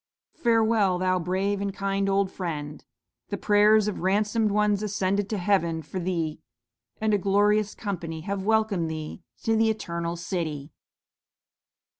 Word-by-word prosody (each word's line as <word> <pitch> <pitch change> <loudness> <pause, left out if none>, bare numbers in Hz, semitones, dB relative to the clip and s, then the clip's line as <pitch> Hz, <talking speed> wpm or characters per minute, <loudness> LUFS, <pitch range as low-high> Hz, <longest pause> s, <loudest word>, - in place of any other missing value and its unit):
"'Farewell, 220 -5 +2
thou 185 0 +1
brave 190 +3 -1
and 200 0 -1
kind 195 0 -1
old 195 -1 +1
Friend! 150 -5 -5 0.5
The - - -2
prayers 210 0 +4
of 210 - -3
ransomed 210 +4 +1
ones 210 0 +2
ascended 200 -1 -1
to 215 - -1
Heaven 175 -4 +1
for 170 +6 -5
thee, 165 -3 -2 0.6
and 220 -1 +1
a 205 - +3
glorious 205 +2 +2
company 170 -6 -4
have 195 +3 -3
welcomed 215 -5 +1
thee 155 +2 -6 0.2
to 225 - +2
the 225 0 +3
Eternal 170 -5 -3
City.'" 160 -5 -4
195 Hz, 140 wpm, -26 LUFS, 170-210 Hz, 0.6 s, prayers